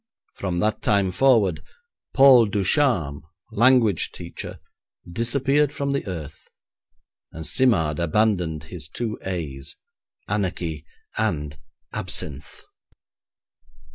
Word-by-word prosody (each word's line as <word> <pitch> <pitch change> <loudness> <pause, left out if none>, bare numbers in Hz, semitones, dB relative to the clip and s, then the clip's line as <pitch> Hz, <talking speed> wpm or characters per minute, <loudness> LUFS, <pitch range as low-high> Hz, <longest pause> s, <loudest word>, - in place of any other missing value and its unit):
From 90 -3 -3
that 110 +2 0
time 100 -3 +2
forward, 105 -7 +3 0.5
Paul 135 -4 +7
Ducharme, 100 - +1 0.3
language 115 -4 +3
teacher, 85 0 -8 0.5
disappeared 135 +9 +1
from 140 -1 -3
the 140 -5 -2
earth, 80 -5 -8 0.8
and 80 -1 -8
Simard 85 - +2
abandoned 85 -3 0
his 80 -1 -9
two 115 -3 -4
A's 75 -7 -5 0.5
anarchy 90 -6 -3 0.3
and 75 0 -1 0.4
absinthe. 70 -1 -4
95 Hz, 90 wpm, -23 LUFS, 80-120 Hz, 0.8 s, Paul